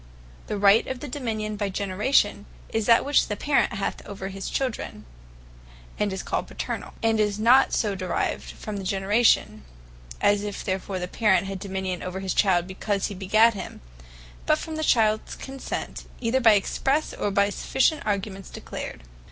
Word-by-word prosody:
The 210 - -2
right 200 +2 +5
of 260 -1 -4
Dominion 225 -7 -4
by 205 -1 -1
Generation, 205 +2 +1 0.2
is 220 -2 -1
that, 230 -1 +5
which 285 +1 +3
the 210 - -2
Parent 285 +7 +1
hath 195 0 -3
over 195 -1 -6
his 195 0 -5
Children; 250 - -3 0.9
and 205 -1 +1
is 190 - -4
called - - -2
PATERNALL. - - -5
And 225 -1 +2
is 210 -1 +1
not 245 +5 +5
so 210 -3 +1
derived 185 -1 -2
from 215 -1 -6
the 195 - -5
Generation, 195 - +2 0.6
as 205 0 +3
if 205 -1 -5
therefore 190 0 -3
the 180 0 -3
Parent 190 -2 +2
had 195 -1 -5
Dominion 190 -2 -3
over 185 +1 -4
his 190 -1 -2
Child 180 -4 +3
because 195 +1 -2
he - - -6
begat 215 +5 +4
him; 200 - -7 0.7
but - - +4
from 320 - -6
the 315 - -2
Childs 215 -5 +2
Consent, 270 0 -6
either 250 +2 +1
expresse, 270 +8 +1
or 205 - -2
by 200 0 +3
other 200 - -1
sufficient 285 +7 +1
arguments 200 -2 -3
declared. - - -7
205 Hz, 170 wpm, -25 LUFS, 195-225 Hz, 0.9 s, right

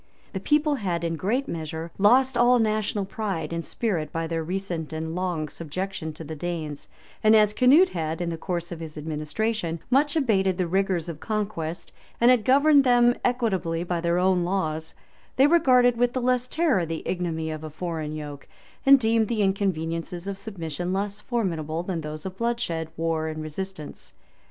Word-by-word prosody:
The 190 - -2
people 300 +8 +2
had 175 -7 -2
in 165 0 -1
a - - -2
great 235 - -1
measure 160 0 -5
lost 255 +6 +5
all 240 +1 +5
national 215 -2 0
pride 190 -6 -3
and 170 0 -2
spirit 170 -10 -2
by 165 0 -2
their 165 0 -2
recent 175 -2 -4
and 160 +1 -4
long 175 -3 -2
subjection 170 +1 -5
to 155 - -9
the 160 +1 -6
Danes; 155 -3 -5 0.4
and 215 0 +6
as 210 -1 +5
Canute 280 - +6
had, 160 -1 -3
in 175 -1 -2
the - - -2
course 175 0 -4
of 170 - -6
his 160 -2 -8
administration, 165 +4 -2
much 290 +3 +3
abated 195 - +2
the 185 - +1
rigors 185 -1 0
of 165 -3 -6
conquest, 195 -6 -3 0.3
and 240 +2 +6
had 245 -4 +3
governed 285 +2 +5
them 245 -1 +5
equitably 190 -9 0
by 175 -1 -2
their 170 0 +1
own 180 -1 +3
laws, 160 -4 -2 0.4
they 265 - +5
regarded 255 -6 +5
with 245 +1 +2
the 255 - 0
less 250 0 +1
terror 300 - +1
the 165 -1 -4
ignominy 165 -3 -2
of 155 0 -6
a 155 - -5
foreign 155 -1 -4
yoke, 145 -2 -7 0.4
and 275 0 +9
deemed 225 -2 +2
the 220 -2 0
inconveniences 175 -2 -1
of 200 - -3
submission 180 -4 -5
less 200 +1 -2
formidable 170 -9 -2
than 175 -3 -3
those 155 +1 -7
of 190 0 -6
bloodshed, 190 -9 -2
war, 165 -1 -1
and 155 0 -4
resistance. 155 0 -7
180 Hz, 180 wpm, -25 LUFS, 160-225 Hz, 0.4 s, and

